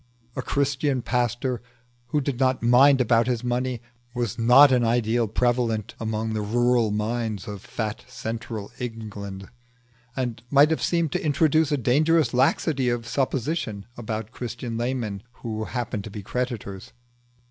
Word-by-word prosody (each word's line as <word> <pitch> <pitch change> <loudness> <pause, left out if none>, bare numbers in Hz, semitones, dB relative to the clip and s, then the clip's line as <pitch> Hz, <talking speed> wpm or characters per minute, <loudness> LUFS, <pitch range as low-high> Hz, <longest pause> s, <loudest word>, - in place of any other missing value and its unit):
A - - -2
Christian 140 -2 0
pastor 120 +1 -1 0.5
who 150 -2 0
did 135 -2 -3
not 130 -2 +2
mind 130 +4 +6
about 120 -1 +3
his 125 -2 -1
money 125 0 -1 0.3
was 120 -4 -2
not 125 +5 +7
an 125 -2 +3
ideal 115 0 +2
prevalent 115 -1 0
among 110 0 -2
the 110 - -1
rural 120 +1 +2
minds 105 -1 -2
of 100 -2 -6
fat 110 -1 -4
central 115 -3 -5
England, 105 -5 -6 0.7
and 120 -4 -3
might 145 +2 +6
have 160 - 0
seemed 170 -4 +1
to - - -2
introduce 155 +1 +3
a 145 - +2
dangerous 145 +2 +3
laxity 130 +1 +2
of 120 -1 -2
supposition 130 - -2
about 110 -1 -5
Christian 120 -1 -5
laymen 115 -4 -2
who 110 -3 -5
happened 115 -5 -3
to - - -6
be 105 0 -8
creditors. 110 -4 -4
120 Hz, 145 wpm, -25 LUFS, 110-130 Hz, 0.7 s, not